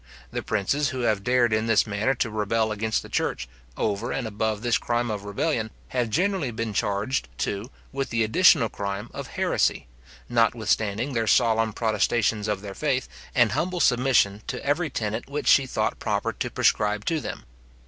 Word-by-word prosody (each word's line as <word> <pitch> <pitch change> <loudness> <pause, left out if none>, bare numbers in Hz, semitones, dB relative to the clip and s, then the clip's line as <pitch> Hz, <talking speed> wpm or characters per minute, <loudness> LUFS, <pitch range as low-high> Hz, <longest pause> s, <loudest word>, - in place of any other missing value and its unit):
The - - -3
princes 125 +7 0
who 130 - -4
have 110 -4 +1
dared 120 -1 +3
in 110 +1 +1
this 115 -2 +4
manner 110 +5 0
to 120 -2 -1
rebel 110 +1 0
against 110 +1 -1
the - - -10
church, - - -2 0.3
over 110 +3 -1
and 135 - -2
above 110 0 -2
this 120 0 +2
crime 120 -1 -1
of 105 -1 -4
rebellion, 110 +2 -1 0.2
have 125 -3 -1
generally 180 - 0
been 115 -1 -3
charged, 100 - -1
too, 100 +4 -3 0.2
with 135 0 -3
the 115 -1 +1
additional 135 +1 +5
crime 100 +2 -5
of - - -6
heresy, - - 0 0.4
notwithstanding 115 +1 +1
their 115 -2 0
solemn 115 -1 +3
protestations 110 0 +1
of 105 -2 -1
their 100 -1 -7
faith, 135 +1 -1 0.3
and - - +4
humble 180 +1 -1
submission 125 -7 +3
to - - -5
every 155 +3 +1
tenet 110 0 -3
which 145 +1 -3
she 135 -1 +5
thought - - -1
proper - - -1
to - - -3
prescribe 105 0 +1
to 165 -2 +1
them. - - -6
115 Hz, 175 wpm, -25 LUFS, 105-125 Hz, 0.4 s, additional